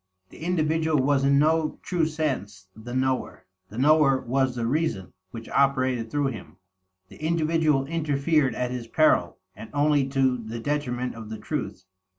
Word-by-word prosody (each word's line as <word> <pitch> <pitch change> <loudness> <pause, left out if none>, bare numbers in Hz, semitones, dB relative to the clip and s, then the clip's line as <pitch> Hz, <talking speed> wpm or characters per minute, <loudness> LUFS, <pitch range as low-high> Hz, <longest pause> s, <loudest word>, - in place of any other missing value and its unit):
The - - -14
individual 160 -2 0
was 135 +1 +2
in 140 0 +4
no 155 +1 +2
true 170 -4 0
sense 130 -12 -3
the 120 +3 -8
knower; 130 0 -1 0.2
the 105 - -10
knower 140 0 +4
was 130 0 0
the 120 -1 -2
"Reason" 130 - -1 0.2
which 115 +2 -9
operated 130 -4 +1
through 145 +2 0
him. 115 -7 -9 0.5
The - - -13
individual 155 -3 +1
interfered 150 -3 0
at 125 0 -2
his 125 -2 -5
peril, 155 +6 +2 0.2
and 110 +2 -10
only 145 -1 +2
to 130 -2 +1
the 115 +1 -6
detriment 125 -2 -2
of 110 -2 -9
the 110 - -5
truth. 105 -5 -5
135 Hz, 160 wpm, -25 LUFS, 120-155 Hz, 0.5 s, in